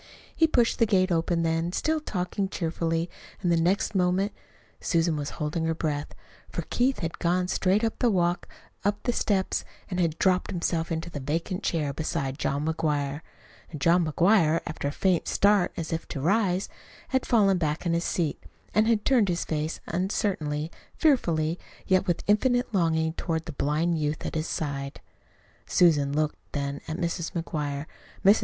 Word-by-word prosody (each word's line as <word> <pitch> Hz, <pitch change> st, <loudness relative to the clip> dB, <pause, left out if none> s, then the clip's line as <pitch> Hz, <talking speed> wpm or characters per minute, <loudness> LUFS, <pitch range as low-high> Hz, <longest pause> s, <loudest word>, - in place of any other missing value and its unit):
He 325 Hz, -, +4 dB
pushed 240 Hz, -7 st, +2 dB
the 230 Hz, -, +4 dB
gate 185 Hz, -3 st, +3 dB
open 170 Hz, 0 st, +1 dB
then, 165 Hz, +1 st, 0 dB
still 315 Hz, +8 st, +1 dB
talking 195 Hz, -6 st, -2 dB
cheerfully, 165 Hz, -1 st, -1 dB, 0.4 s
and 175 Hz, -, +2 dB
the 165 Hz, -1 st, +3 dB
next 185 Hz, +6 st, +1 dB
moment 190 Hz, +2 st, +2 dB, 0.5 s
Susan 165 Hz, -1 st, +1 dB
was 145 Hz, -1 st, -3 dB
holding 160 Hz, +1 st, -1 dB
her 160 Hz, 0 st, 0 dB
breath, 150 Hz, -2 st, -3 dB, 0.3 s
for -, -, -4 dB
Keith 260 Hz, +2 st, +1 dB
had 165 Hz, -1 st, -4 dB
gone 180 Hz, +1 st, +1 dB
straight 190 Hz, +4 st, +2 dB
up 225 Hz, -, -1 dB
the 245 Hz, -, +3 dB
walk 175 Hz, -3 st, +1 dB, 0.4 s
and 200 Hz, -, +4 dB
up -, -, -29 dB
the 245 Hz, -, 0 dB
steps, 195 Hz, -5 st, 0 dB, 0.3 s
and 180 Hz, -, -1 dB
had 165 Hz, -3 st, +1 dB
dropped 185 Hz, -1 st, +2 dB
himself 170 Hz, -2 st, -1 dB
into 165 Hz, +1 st, -3 dB
the 145 Hz, -, -5 dB
vacant 165 Hz, +7 st, -2 dB
chair 150 Hz, -4 st, -1 dB
beside 140 Hz, -2 st, -2 dB
John 140 Hz, +2 st, -1 dB
McGuire 150 Hz, -2 st, -1 dB, 0.5 s
and 155 Hz, -, -7 dB
John 170 Hz, +5 st, +4 dB
McGuire, 165 Hz, 0 st, +3 dB
after 155 Hz, -, -3 dB
a -, -, -1 dB
faint 180 Hz, +2 st, +1 dB
start 200 Hz, -3 st, +3 dB
as 165 Hz, -1 st, -3 dB
if 165 Hz, -, -3 dB
to -, -, -5 dB
rise, 190 Hz, +3 st, +2 dB, 0.4 s
had 260 Hz, -1 st, +1 dB
fallen 200 Hz, -6 st, +3 dB
back 155 Hz, +1 st, -1 dB
in 170 Hz, -, +1 dB
his 170 Hz, +1 st, +1 dB
seat, 165 Hz, -4 st, -1 dB, 0.3 s
and 215 Hz, +1 st, +4 dB
had 225 Hz, -2 st, +2 dB
turned 235 Hz, -7 st, +4 dB
his 175 Hz, 0 st, -1 dB
face 155 Hz, 0 st, -2 dB
uncertainly, 170 Hz, -4 st, -1 dB, 0.2 s
fearfully, 170 Hz, -, +2 dB, 0.3 s
yet 185 Hz, +1 st, +2 dB
with 175 Hz, -, 0 dB
infinite 245 Hz, +3 st, +2 dB
longing, 160 Hz, -3 st, +2 dB
toward 165 Hz, -1 st, -2 dB
the 165 Hz, -, -5 dB
blind 155 Hz, +4 st, 0 dB
youth 150 Hz, 0 st, -2 dB
at -, -, -3 dB
his 155 Hz, +1 st, -1 dB
side. 140 Hz, -2 st, -3 dB, 0.7 s
Susan 150 Hz, -5 st, +4 dB
looked 150 Hz, +1 st, 0 dB
then 140 Hz, -1 st, -3 dB
at 155 Hz, -, -3 dB
Mrs. 170 Hz, -1 st, -2 dB
McGuire. 150 Hz, -4 st, -3 dB, 0.4 s
Mrs. 200 Hz, +3 st, +7 dB
170 Hz, 175 wpm, -27 LUFS, 155-190 Hz, 0.7 s, Mrs